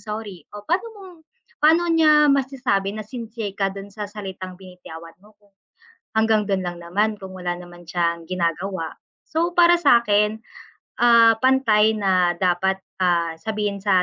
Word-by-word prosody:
sorry 210 -4 -7
o 205 - -10
paano 360 - 0
mo 400 - -13 0.6
paano 325 +3 +4
niya 305 -2 +5
masasabi 245 -7 -1
na 215 - -6
sincere 225 -2 -6
ka 195 0 -1
dun 195 +1 -9
sa 210 -1 -6
salitang 190 -3 -8
binitawan 180 -3 -12
mo 210 +1 -22
kung 205 -1 -31 0.6
hanggang 220 -2 +2
dun 190 -2 -1
lang 175 -1 -5
naman 205 +5 -1
kung 190 -1 -9
wala 180 -1 -3
naman 175 0 -11
siyang 170 0 -2
ginagawa. 175 0 -3 0.3
So, 335 +2 -1
para 345 0 +5
sa 285 -8 +4
akin, 210 -1 +1 0.6
ah, 230 -2 +5
pantay 225 -4 +3
na 185 -4 +1
dapat, 190 +2 0 0.2
ah, 170 -3 0
sabihin 210 +1 -3
sa 195 -2 +2
205 Hz, 155 wpm, -22 LUFS, 185-225 Hz, 0.6 s, niya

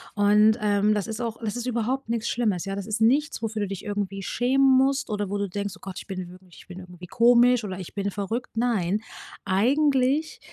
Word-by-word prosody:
Und, 210 +1 +4
ähm, 205 0 +2
das 205 - -1
ist 220 +1 -5
auch 230 -2 -3
das 215 -1 -2
ist 245 0 -4
überhaupt 250 +2 -2
nix 230 -1 -1
Schlimmes, 210 -7 -1
ja, 195 0 -4
das 200 0 -6
ist 215 +1 -2
nichts, 275 +5 +2
wofür 220 -1 -3
du - - -2
dich 195 -1 -7
irgendwie 200 -2 -3
schämen 265 +6 +3
musst 270 +1 +1
oder 205 -2 -2
wo 205 - -2
du 200 0 -2
denkst: 200 +1 -4
„Oh - - -27
Gott, 195 -2 -8
ich - - -12
bin 185 -2 -7
ich 160 - -16
bin 185 0 -9
irgendwie 180 -1 -11
komisch, 240 +3 +4
oder 190 -3 -5
ich 185 - -9
bin 200 0 -1
verrückt. 220 +5 -4
Nein. 215 -5 0 0.4
Eigentlich 270 +8 +1
215 Hz, 215 wpm, -25 LUFS, 195-245 Hz, 0.4 s, Und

